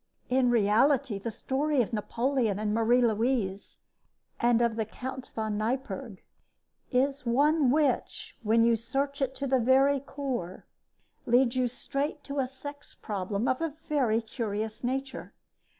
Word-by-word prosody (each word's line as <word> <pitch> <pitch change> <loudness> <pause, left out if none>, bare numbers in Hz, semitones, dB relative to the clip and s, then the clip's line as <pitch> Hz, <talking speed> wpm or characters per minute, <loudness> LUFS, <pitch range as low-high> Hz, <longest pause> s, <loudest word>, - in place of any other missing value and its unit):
In 255 0 +3
reality 230 +1 +3
the 230 - -4
story 270 +4 0
of 230 - -8
Napoleon 230 0 0
and 210 0 -1
Marie 230 +3 +3
Louise 220 -3 -1 0.6
and 235 -1 +3
of 235 -2 +1
the 225 - 0
Count 260 +4 -7
von 215 -2 -2
Neipperg 240 -2 -3 0.7
is 275 +2 +1
one 285 +4 +3
which, 315 - 0
when 230 +1 +3
you 230 0 +4
search 275 +5 -2
it 265 0 -1
to 275 - -3
the 265 -1 +2
very 270 +3 +4
core, 265 -10 -5 0.6
leads 245 +1 +3
you 255 -1 +2
straight 280 +4 -4
to 280 0 -4
a 260 - +1
sex 285 +2 -10
problem 200 +1 -3
of 260 - 0
a 325 -3 -2
very 250 -7 +2
curious 220 -1 -4
nature. 265 +2 -4
250 Hz, 145 wpm, -28 LUFS, 225-275 Hz, 0.7 s, you